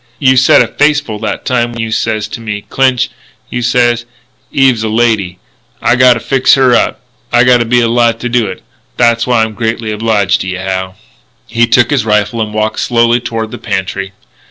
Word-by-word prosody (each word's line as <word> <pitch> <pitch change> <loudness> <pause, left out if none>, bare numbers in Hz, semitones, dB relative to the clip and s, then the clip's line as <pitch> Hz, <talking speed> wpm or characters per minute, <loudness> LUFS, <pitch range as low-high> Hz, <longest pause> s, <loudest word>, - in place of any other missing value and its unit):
"You 130 -2 +3
said 130 -1 +5
a - - -4
face 150 +5 +2
full 110 -7 -7
that - - -4
time 120 -2 0
when 115 - -8
you 110 0 -4
says 110 -1 -1
to 115 - -7
me, 105 -2 -5
'Clinch,' 130 -2 0 0.4
you 120 - -3
says, 120 0 +1 0.5
'Eve 135 -1 +3
is 115 - -6
a 110 - -2
lady.'... 110 -5 0 0.4
I 120 - +2
gotta 125 -1 +4
fix 130 +2 +2
her 130 -2 +3
up. 120 - +1 0.3
I 120 0 +4
gotta 125 -1 +3
be 120 +1 +2
alive 115 0 +1
to 125 - -2
do 120 -2 0
it.... 95 - -8 0.3
That's 120 0 +2
why 120 -3 +2
I'm 110 -1 -3
greatly 115 +1 -3
obliged 105 -2 0
to - - -5
yeh, 95 0 -4
Hal." 95 -1 -3 0.5
He 115 0 +1
took 120 +1 +3
his 140 -6 +1
rifle 105 +1 0
and 110 -1 -3
walked 110 0 -2
slowly 120 0 +2
toward 115 -2 -4
the - - -8
pantry. 95 -1 -4
115 Hz, 205 wpm, -12 LUFS, 110-120 Hz, 0.5 s, said